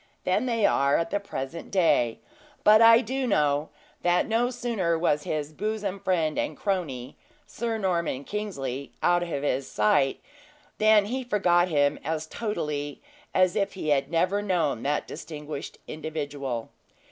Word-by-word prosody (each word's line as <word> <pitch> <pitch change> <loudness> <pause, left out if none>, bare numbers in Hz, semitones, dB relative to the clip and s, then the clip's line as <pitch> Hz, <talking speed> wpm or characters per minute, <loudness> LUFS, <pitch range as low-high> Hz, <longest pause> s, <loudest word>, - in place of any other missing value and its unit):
than 205 +7 +1
they 230 -4 +2
are 140 -4 +3
at 165 - -2
the 205 - +1
present 165 -5 -6
day; 165 - +2 0.5
but 215 +1 +7
I 230 +1 +8
do 260 +2 -2
know, 150 -6 +1 0.3
that 175 0 +2
no 230 +2 +2
sooner 230 -9 -1
was 150 -3 +1
his 150 0 -3
bosom 205 +1 -3
friend 170 -5 0
and - - -2
crony, 145 - -3 0.3
Sir 230 -1 -3
Norman 170 -9 -1
Kingsley, 140 -10 -4
out 175 0 +4
of 145 -5 -1
sight, 130 +3 +2 0.6
than 215 -1 +5
he 255 +5 -3
forgot 180 -7 +3
him 145 -4 +2
as 155 +1 -2
totally 150 -8 -3 0.4
as 185 -1 +4
if 200 -2 0
he 185 -5 -4
had 140 -1 +2
never 185 +5 +1
known 170 - 0
that 145 +1 -1
distinguished 150 -2 -7
individual. 145 -6 -4
170 Hz, 145 wpm, -26 LUFS, 145-205 Hz, 0.6 s, I